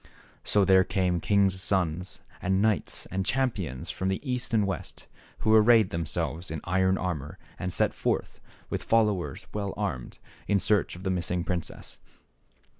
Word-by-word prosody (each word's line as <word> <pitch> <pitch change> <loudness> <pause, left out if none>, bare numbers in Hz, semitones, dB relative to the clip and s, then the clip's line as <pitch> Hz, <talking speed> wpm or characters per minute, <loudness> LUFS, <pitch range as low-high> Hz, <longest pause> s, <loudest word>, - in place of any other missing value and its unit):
So 105 -2 +3
there 95 -1 +6
came 90 -2 0
kings' 95 0 +2
sons, 90 -2 -1 0.2
and 95 +1 +1
knights 110 0 +1
and 95 +1 -1
champions, 110 - -1
from 95 - -3
the 95 0 0
East 125 -1 -2
and 110 -3 +3
the - - +1
West, 95 - -5 0.4
who 110 - +3
arrayed 110 -2 +6
themselves 85 +1 -2
in 80 0 -4
iron 95 +1 +2
armor 75 -6 -4 0.2
and 90 - -2
set - - +1
forth, - - -2 0.3
with - - -3
followers 105 -5 +1
well 100 -2 -3
armed, 95 -13 -3 0.3
in 100 - +3
search 100 -1 +1
of 90 - -10
the 95 - 0
miss 90 -2 -1
ing 90 -1 0
princess. 85 -1 -5
95 Hz, 165 wpm, -28 LUFS, 90-105 Hz, 0.4 s, there